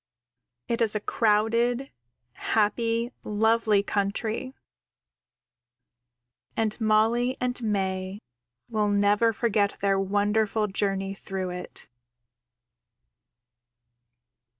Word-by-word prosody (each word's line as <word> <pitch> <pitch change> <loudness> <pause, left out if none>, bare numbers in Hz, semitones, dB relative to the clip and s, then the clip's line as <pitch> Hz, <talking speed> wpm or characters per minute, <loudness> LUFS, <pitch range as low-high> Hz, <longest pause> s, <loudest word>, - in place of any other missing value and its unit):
It 235 +1 -1
is 220 -2 +3
a - - +1
crowded, 230 +5 +1 0.4
happy, 230 +2 0
lovely 220 -1 +2
country, 220 +6 -2 2.0
and 220 +1 -1
Molly 225 +4 +2
and 250 0 -2
May 190 -3 -2 0.5
will 215 -2 0
never 205 +3 +3
forget 210 -2 0
their 195 -1 +2
wonderful 205 +2 +1
journey 195 -1 -1
through 190 -1 -5
it. 180 -9 -8
215 Hz, 80 wpm, -26 LUFS, 200-230 Hz, 2.0 s, is